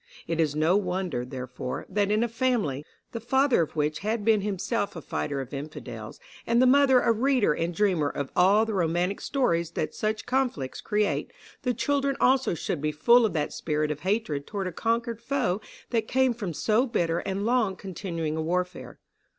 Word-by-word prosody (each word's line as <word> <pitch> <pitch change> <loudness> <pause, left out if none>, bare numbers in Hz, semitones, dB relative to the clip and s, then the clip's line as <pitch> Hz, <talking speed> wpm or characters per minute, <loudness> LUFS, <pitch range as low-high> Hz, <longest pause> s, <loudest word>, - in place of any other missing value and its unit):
It 165 -1 -2
is 150 -3 +1
no 160 +4 +3
wonder, 180 -9 -2
therefore, 125 0 -6
that 205 -1 0
in 215 +2 +2
a - - +1
family, 230 - 0 0.3
the 230 - -4
father 265 0 +3
of 160 - -3
which 150 0 0
had 215 +1 -2
been 220 -2 +4
himself 200 +2 -2
a 165 - -6
fighter 140 -2 -3
of 135 0 -9
Infidels, 145 +2 -7 0.3
and 235 +1 +3
the 255 - +6
mother 265 -1 +5
a - - +3
reader 245 - +2
and 165 +3 -2
dreamer 175 -6 +1
of 140 -1 -4
all 200 +5 +5
the 220 - -3
romantic 180 +1 0
stories 170 - 0
that 155 - -2
such 215 0 -2
conflicts 250 - -1
create, 210 -1 0 0.3
the 250 -2 -1
children 280 +1 0
also 260 -7 +3
should 155 -1 -3
be 150 0 0
full 235 +10 +5
of 195 - -6
that 150 -3 -1
spirit 150 -1 -1
of 150 - -4
hatred 185 -6 -1
toward 200 -2 -3
a 185 - -2
conquered 230 +4 -1
foe 220 -7 -1 0.3
that 225 -2 0
came 260 -1 +2
from 210 -6 -4
so 220 - +1
bitter 170 -8 0
and 195 +1 -3
long 230 -5 +2
continuing 170 -5 -4
a 160 - -1
warfare. 180 +3 -3
200 Hz, 190 wpm, -27 LUFS, 160-235 Hz, 0.3 s, the